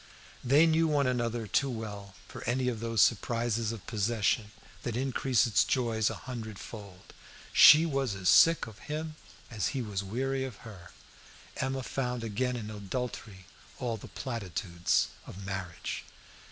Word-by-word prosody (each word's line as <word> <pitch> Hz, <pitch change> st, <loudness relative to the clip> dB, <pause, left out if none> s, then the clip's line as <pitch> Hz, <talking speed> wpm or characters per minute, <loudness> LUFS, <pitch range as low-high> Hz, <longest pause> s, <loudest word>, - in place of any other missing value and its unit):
They 140 Hz, +6 st, +5 dB
knew 165 Hz, 0 st, +3 dB
one 145 Hz, -2 st, +2 dB
another 120 Hz, -2 st, -1 dB
too 135 Hz, +6 st, +1 dB
well 105 Hz, -5 st, -6 dB
for -, -, -9 dB
any 125 Hz, +2 st, 0 dB
of 115 Hz, -3 st, -4 dB
those 115 Hz, -2 st, +3 dB
surprises 115 Hz, 0 st, +1 dB
of 115 Hz, -4 st, -8 dB
possession 110 Hz, 0 st, 0 dB, 0.3 s
that 120 Hz, -, -3 dB
increase 130 Hz, -1 st, +2 dB
its 115 Hz, -4 st, +3 dB
joys 115 Hz, -4 st, +1 dB
a -, -, -4 dB
hundred 115 Hz, -5 st, -6 dB
fold. 100 Hz, -5 st, -11 dB, 0.4 s
She 155 Hz, +2 st, +9 dB
was 135 Hz, -8 st, -1 dB
as 95 Hz, -1 st, -3 dB
sick 165 Hz, 0 st, +6 dB
of 110 Hz, -1 st, -12 dB
him 155 Hz, +1 st, -3 dB, 0.4 s
as 105 Hz, -5 st, -1 dB
he 130 Hz, -, -1 dB
was 100 Hz, -3 st, -3 dB
weary 130 Hz, +6 st, -2 dB
of 130 Hz, -4 st, -5 dB
her. 95 Hz, -6 st, -11 dB, 0.7 s
Emma 130 Hz, 0 st, -2 dB
found 125 Hz, -2 st, -3 dB
again 125 Hz, +3 st, -1 dB
in 110 Hz, -3 st, -5 dB
adultery 105 Hz, -2 st, -5 dB, 0.3 s
all 120 Hz, -3 st, -2 dB
the 110 Hz, -, -10 dB
platitudes 95 Hz, -7 st, -1 dB, 0.2 s
of 95 Hz, +1 st, -9 dB
marriage. 95 Hz, -4 st, -5 dB
115 Hz, 155 wpm, -30 LUFS, 105-130 Hz, 0.7 s, She